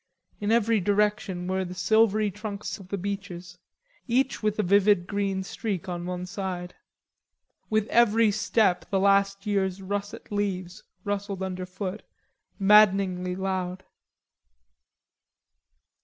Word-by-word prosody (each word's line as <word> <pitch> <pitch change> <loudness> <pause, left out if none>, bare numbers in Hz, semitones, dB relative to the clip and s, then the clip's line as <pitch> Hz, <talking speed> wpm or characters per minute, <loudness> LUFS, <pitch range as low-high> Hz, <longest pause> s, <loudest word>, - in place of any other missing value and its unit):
In 205 +1 -1
every 230 -1 +3
direction 205 -2 0
were 190 0 0
the 180 0 -7
silvery 215 +2 +3
trunk 210 +1 -6 0.2
of 190 - -12
the 200 - -3
beeches, 180 -2 -6 0.5
each 260 +2 +1
with 215 -1 0
a 215 - +1
vivid 200 -1 +4
green 195 -1 -1
streak 195 -3 -4
on 175 -1 -4
one 180 0 -4
side. 180 -1 -5 1.0
With 215 -1 +2
every 230 -2 +4
step 205 -2 +1
the 195 - +1
last 200 +1 +2
year's 195 -2 0
russet 200 +2 -5
leaves 185 -3 -3 0.2
rustled 200 -1 -3
underfoot, 185 +2 -5 0.6
maddeningly 195 -3 +4
loud. 190 -1 -3
195 Hz, 115 wpm, -26 LUFS, 185-210 Hz, 1.0 s, vivid